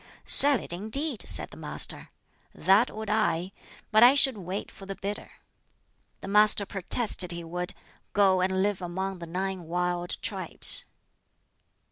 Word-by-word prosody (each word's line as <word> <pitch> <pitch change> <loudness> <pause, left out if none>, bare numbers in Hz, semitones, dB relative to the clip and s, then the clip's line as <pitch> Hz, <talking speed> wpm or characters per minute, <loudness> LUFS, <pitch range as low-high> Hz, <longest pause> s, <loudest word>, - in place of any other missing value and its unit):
"Sell 280 -3 +8
it, - - -8
indeed," 225 - -2
said - - +1
the - - -13
Master - - -3 0.5
"that 200 +6 +2
would 220 0 -9
I; 195 -4 -2 0.4
but 215 - +3
I 245 +3 +6
should 270 -3 +4
wait 190 0 -7
for 195 - -14
the 195 - -7
bidder." 200 +2 -7 0.9
The - - -9
Master 210 0 +4
protested 195 -1 +1
he 170 0 -7
would 180 +3 -6 0.4
"go 190 -2 +2
and 190 +1 -1
live 205 -2 -3
among 190 +2 -6
the 170 - -9
nine 185 +1 -5
wild 175 +1 -4
tribes." - - -1
195 Hz, 145 wpm, -25 LUFS, 180-215 Hz, 0.9 s, Sell